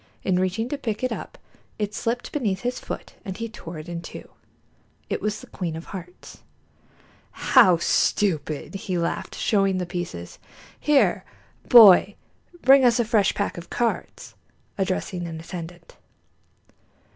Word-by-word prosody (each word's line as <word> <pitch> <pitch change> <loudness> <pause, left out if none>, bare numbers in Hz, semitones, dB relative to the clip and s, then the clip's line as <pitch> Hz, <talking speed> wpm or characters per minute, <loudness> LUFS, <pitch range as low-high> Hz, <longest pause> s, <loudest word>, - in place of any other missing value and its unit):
In 180 -1 +1
reaching 185 +5 -1
to 290 - -4
pick 220 -3 -4
it 255 - 0
up - - -6 0.4
it 210 -1 -3
slipped 230 +3 -3
beneath 210 -10 -1
his 245 +1 -2
foot - - -7
and 190 -3 -6
he 230 +1 -4
tore 170 -7 -9
it 155 +2 -9
into 170 0 -7
two. - - -22 0.8
It - - -1
was 210 0 -2
the - - -11
queen 170 -4 -5
of 165 - -7
hearts. 180 -2 -10 0.9
"How 180 -2 +5
stupid!" 160 -4 0
he 190 -2 -3
laughed, 170 0 -3
showing 195 -3 +1
the 180 - -2
pieces. 175 - -6 0.4
"Here, 295 -2 +3 0.5
boy, 205 -4 +8 0.5
bring 270 +1 +7
us 245 -1 +4
a 235 - +2
fresh 215 -3 +2
pack 200 -3 -2
of 170 - -12
cards," 240 -1 -3 0.4
addressing 185 -2 -2
an 160 -1 -7
attendant. 170 0 -9
190 Hz, 145 wpm, -24 LUFS, 175-225 Hz, 0.9 s, boy